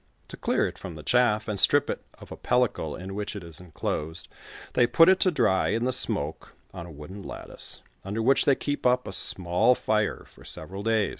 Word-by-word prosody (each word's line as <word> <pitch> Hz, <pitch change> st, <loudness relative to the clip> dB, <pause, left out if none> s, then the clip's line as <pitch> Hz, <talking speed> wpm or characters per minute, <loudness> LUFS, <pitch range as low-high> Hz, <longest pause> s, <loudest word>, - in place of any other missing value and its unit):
To -, -, -7 dB
clear -, -, +1 dB
it -, -, -9 dB
from 90 Hz, -4 st, -8 dB
the 75 Hz, -, -9 dB
chaff, 110 Hz, -2 st, +2 dB
and 105 Hz, -3 st, -2 dB
strip 90 Hz, -, +5 dB
it -, -, -4 dB
of -, -, -14 dB
a -, -, -5 dB
pellicle 110 Hz, -12 st, 0 dB
in 95 Hz, +1 st, -7 dB
which 105 Hz, +1 st, -4 dB
it 100 Hz, -, -6 dB
is 85 Hz, -2 st, -8 dB
enclosed, 80 Hz, -1 st, -4 dB, 0.4 s
they 120 Hz, -, +4 dB
put 165 Hz, +8 st, +6 dB
it 190 Hz, 0 st, +5 dB
to 185 Hz, -, +4 dB
dry 95 Hz, -, +2 dB
in 115 Hz, +6 st, 0 dB
the 130 Hz, -, 0 dB
smoke 100 Hz, -, -2 dB, 0.2 s
on 85 Hz, -, -7 dB
a -, -, -10 dB
wooden 75 Hz, +7 st, -10 dB
lattice, -, -, -5 dB, 0.2 s
under 105 Hz, +3 st, -3 dB
which 135 Hz, +3 st, +4 dB
they 140 Hz, -, +5 dB
keep 145 Hz, +2 st, -3 dB
up 125 Hz, 0 st, +2 dB
a 95 Hz, -, -5 dB
small 90 Hz, +7 st, +3 dB
fire 105 Hz, -3 st, -1 dB
for -, -, -18 dB
several 95 Hz, +2 st, -4 dB
days. 110 Hz, -1 st, +1 dB
105 Hz, 215 wpm, -26 LUFS, 90-125 Hz, 0.4 s, put